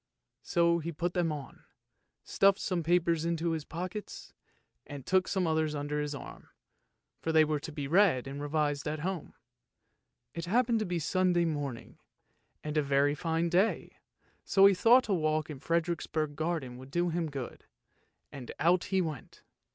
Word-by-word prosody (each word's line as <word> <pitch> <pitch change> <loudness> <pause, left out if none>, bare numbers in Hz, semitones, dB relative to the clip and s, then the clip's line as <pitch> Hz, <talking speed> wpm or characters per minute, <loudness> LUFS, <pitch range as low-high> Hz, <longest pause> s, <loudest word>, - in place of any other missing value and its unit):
So 170 0 +2
he 170 +1 -4
put 175 +2 -2
them 175 -3 +1
on, 145 -3 -8 0.6
stuffed 195 0 +3
some 180 -5 -2
papers 170 -1 +2
into 170 0 -1
his 160 -2 -2
pockets 180 +6 -7 0.5
and 140 -3 -8
took 185 0 +2
some 190 -2 0
others 160 -1 0
under 145 +1 -2
his 150 0 -3
arm, - - -10 0.7
for 160 - -2
they 160 -1 +5
were 150 -1 -1
to 155 - -8
be 145 -2 -4
read 170 -6 +3
and 140 +1 -6
revised 145 -1 -1
at 150 0 -3
home. 185 -1 -4 1.0
It 170 0 -5
happened 230 +4 +2
to 215 - -1
be 175 -1 -1
Sunday 175 +1 +1
morning, 145 -7 -4 0.6
and 150 0 -3
a - - +4
very 140 0 +2
fine 165 +2 -1
day, 185 +6 0 0.5
so 195 0 +5
he 200 - +7
thought 240 +7 +5
a 205 - +1
walk 155 -2 0
in 140 - -8
Frederiksborg 160 -1 -1
garden 155 -6 -3
would 130 +1 -11
do 175 +4 0
him 165 -1 -2
good, 135 -4 -7 0.7
and 135 -5 -8
out 175 +2 +3
he 190 -1 +1
went. 155 -7 -6
160 Hz, 165 wpm, -30 LUFS, 150-175 Hz, 1.0 s, he